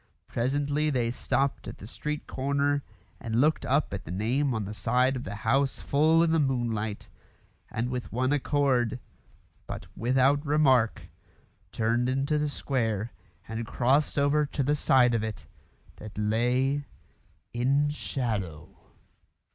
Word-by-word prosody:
Presently 145 +5 0
they 120 -5 0
stopped 135 +2 -1
at - - -7
the - - -11
street 150 +6 -4
corner 140 +1 0 0.4
and 115 -1 -1
looked 155 +4 +2
up 140 -4 +1
at 95 - -4
the - - -11
name 125 +9 0
on 110 -2 -2
the 105 - -6
side 125 +5 +1
of 125 - -5
the 100 - -5
house 135 +4 +2
full 160 +3 +3
in 165 - +2
the 165 - +3
moonlight, 115 -6 -1 0.6
and 115 +2 -2
with 125 -1 -4
one 130 +4 +1
accord, 135 -5 +1 0.7
but - - -6
without 130 +4 +2
remark, 135 -6 +3 0.7
turned 115 +3 +1
into 135 +3 0
the 150 0 0
square 115 -6 -1 0.4
and 115 +1 -4
crossed 135 +6 +1
over 145 +1 +3
to 140 0 -2
the 145 +3 +2
side 130 -4 +4
of 115 - +1
it 110 -1 -5 0.5
that 105 -1 -10
lay 125 +6 +1 0.7
in 140 +5 +2
shadow. 105 - -3
130 Hz, 140 wpm, -28 LUFS, 115-145 Hz, 0.7 s, side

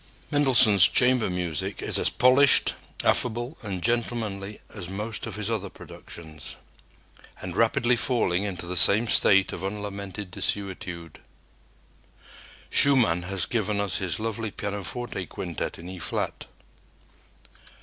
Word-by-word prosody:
Mendelssohn's 125 -9 +5
chamber 125 -3 +3
music 90 -5 -4
is - - +1
as - - +1
polished, 130 +3 +5 0.3
affable 120 +4 +2
and 95 -6 -6
gentlemanly 110 -4 -2
as 95 -5 -7
most 105 +3 -5
of - - -6
his 105 +1 -3
other 100 -3 -3
productions, 80 -4 -11 0.8
and 90 -1 -7
rapidly 120 +2 +2
falling 110 -7 +1
into 95 -4 -5
the 90 +1 -6
same 100 +8 +5
state 95 -3 +3
of 90 - -7
unlamented 100 -1 -6
desuetude. 90 -4 -5 1.5
Schumann 120 -12 +4
has 95 0 -1
given 105 -3 -2
us 100 -2 -1
his 95 -1 -3
lovely 110 0 -4
pianoforte 100 +2 -5
quintet 85 -4 -6
in 85 - -11
E 95 0 -9
flat. 80 - -4
100 Hz, 120 wpm, -25 LUFS, 90-115 Hz, 1.5 s, Mendelssohn's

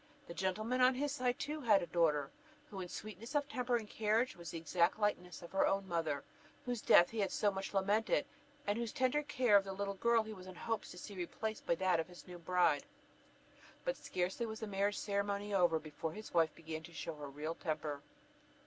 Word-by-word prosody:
The - - -8
gentleman 215 +8 0
on 255 +1 +6
his 285 +2 0
side 250 -2 0
too 300 +2 -3
had 215 -7 +5
a - - -2
daughter, 150 -5 +2 0.4
who 195 -2 -5
in 180 - -6
sweetness 215 - -7
of 290 -1 +2
temper 250 -1 0
and 225 -3 -1
carriage 220 +4 +1
was 170 -1 -8
the 170 - -4
exact 170 +1 +2
likeness 180 -5 -1
of 170 - -10
her 195 - +3
own 195 0 0
mother, 160 -5 -1 0.4
whose 245 -3 -2
death 175 - +7
he 225 - -3
had 195 -3 +1
so 205 - +2
much 195 0 -4
lamented, 205 +8 +2 0.4
and 205 +3 0
whose 235 -2 -2
tender 260 +3 +2
care 255 -7 +3
of 200 - +7
the 195 0 -5
little 200 +1 -2
girl 230 +3 +3
he 220 0 -7
was 185 -2 -11
in 185 - -9
hopes 225 +4 -3
to 180 - -10
see 200 - -8
replaced 215 +4 -4
by 170 - +3
that 185 -1 +2
of 165 - -1
his 180 -1 -13
new 180 -1 -8
bride. 175 -4 +2 1.0
But - - +1
scarcely 185 +6 -2
was 220 0 -5
the - - -1
marriage 200 0 0
ceremony 200 0 -1
over, 175 -4 +4
before 155 +1 -5
his 215 +3 -9
wife 165 -2 +3
began 160 -1 -6
to 165 +1 -12
show 165 +1 -4
her 145 -1 -6
real 150 +4 -4
temper. 155 -3 -3
195 Hz, 220 wpm, -36 LUFS, 170-220 Hz, 1.0 s, death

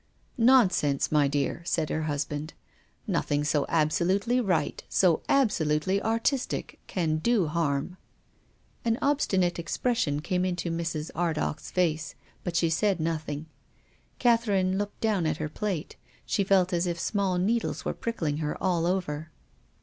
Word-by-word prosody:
" - - -36 0.2
Nonsense, 180 - +2
my 150 -2 +4
dear," 145 +3 -1
said 160 -2 -1
her 160 - -1
husband. 150 +1 -3 0.3
" - - -37
Nothing 145 0 0
so 145 -1 +1
absolutely 185 +9 +2
right, 180 -9 0
so 180 -4 +3
absolutely 190 - +2
artistic, 230 +5 -1
can 160 -4 0
do 220 +2 +2
harm." 155 +1 -1 0.9
An 230 -1 +1
obstinate 190 -12 +1
expression 170 - 0
came 180 +3 -1
into 180 -2 -1
Mrs. 165 -2 -3
Ar 170 -1 0
dagh's 155 0 -3
face, 165 -3 0 0.3
but 175 -2 -3
she 170 0 +3
said 195 +2 +1
nothing. 155 -2 -2 0.7
Catherine 205 -6 +2
looked 205 0 -4
down 205 -7 +1
at 155 -1 -1
her 155 - -2
plate. 185 -1 -4 0.3
She 200 - +1
felt 190 -1 +3
as 175 +1 +1
if 170 -1 -2
small 195 -1 0
needles 225 +6 0
were - - -1
pricking 165 -11 -2
her 150 -1 -2
all 175 -3 +1
over. 160 -4 -2
175 Hz, 145 wpm, -27 LUFS, 155-200 Hz, 0.9 s, my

